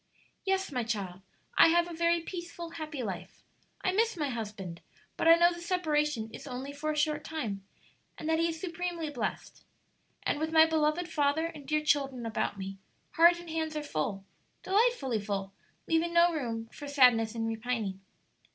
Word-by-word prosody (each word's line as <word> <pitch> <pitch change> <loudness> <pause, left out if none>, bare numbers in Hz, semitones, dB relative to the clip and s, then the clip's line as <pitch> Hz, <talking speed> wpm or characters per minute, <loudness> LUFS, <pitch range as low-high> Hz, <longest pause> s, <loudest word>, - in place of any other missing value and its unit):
"Yes, 385 -2 0
my 250 -3 -1
child; 195 -5 -3 0.4
I - - +10
have 345 +1 +4
a 345 - -7
very 335 +1 +2
peaceful, 340 -1 -7
happy 310 -5 -5
life. 185 -3 -6 0.4
I 370 - +1
miss 445 +1 +1
my 295 -3 -1
husband, 210 -7 -5 0.3
but - - 0
I 330 - +10
know 345 +1 +5
the 345 - -9
separation 300 -10 0
is - - -9
only 265 +2 -5
for 300 +2 -3
a 305 - -3
short 300 0 +1
time, 225 -13 -4 0.5
and 310 - -6
that 320 0 +2
he 335 0 +2
is 325 -1 -5
supremely 340 -2 -3
blessed. 240 -7 -4 0.6
And - - 0
with 315 +1 -1
my 320 0 +8
beloved 320 +2 +1
father 305 -1 +1
and 310 -4 -7
dear 305 +1 0
children 270 -5 +1
about 220 -2 -1
me, 195 0 -6 0.3
heart 340 +1 +6
and 345 -2 -9
hands 320 -1 -2
are 300 - -3
full 195 - -3 0.4
delightfully 380 - +2
full 195 -1 -3 0.3
leaving 335 +1 +1
no 340 0 +6
room 230 -7 -3
for 290 - -8
sadness 245 -5 +4
and 225 -1 -1
repining." 225 -4 -2
300 Hz, 180 wpm, -30 LUFS, 225-335 Hz, 0.6 s, I